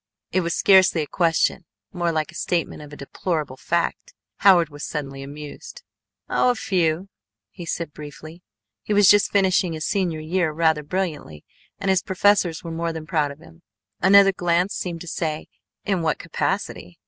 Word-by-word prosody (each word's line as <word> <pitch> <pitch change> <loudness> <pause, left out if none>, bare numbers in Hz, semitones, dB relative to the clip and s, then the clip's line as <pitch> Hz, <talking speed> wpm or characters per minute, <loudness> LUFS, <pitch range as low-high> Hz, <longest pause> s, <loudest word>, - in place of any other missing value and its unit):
It 185 - +2
was 170 -1 -2
scarcely 190 -4 +5
a - - -5
question, 165 +2 +1 0.3
more 175 -2 0
like 155 0 -2
a - - -20
statement 170 -2 -2
of 150 -1 -11
a - - -9
deplorable 150 -1 -3
fact. 170 +5 -2 0.2
Howard 175 -5 +5
was 145 0 -10
suddenly 135 -3 -5
amused. 150 - -9 0.4
"Oh, - - +2
a 245 - +2
few," 180 -3 0 0.4
he 170 +7 -9
said 165 -2 -4
briefly. 155 +3 -10 0.4
(He 210 - -2
was 205 -1 +6
just 205 +1 +6
finishing 190 -3 +2
his 155 0 -4
senior 180 -6 -1
year 165 +1 0
rather 160 -1 +2
brilliantly 150 - -4 0.3
and 195 -1 0
his 190 -1 +2
professors 190 -3 +2
were 165 - -6
more 165 +1 -2
than 160 -1 -7
proud 155 -3 0
of 140 - -9
him.) 165 +1 -17 0.4
Another 195 +1 +7
glance 175 +1 +1
seemed 170 -2 -4
to 175 - -9
say: 155 -2 -3 0.4
"In 195 -4 0
what 160 -3 0
capacity?" 90 -1 -3
170 Hz, 170 wpm, -23 LUFS, 155-185 Hz, 0.4 s, Another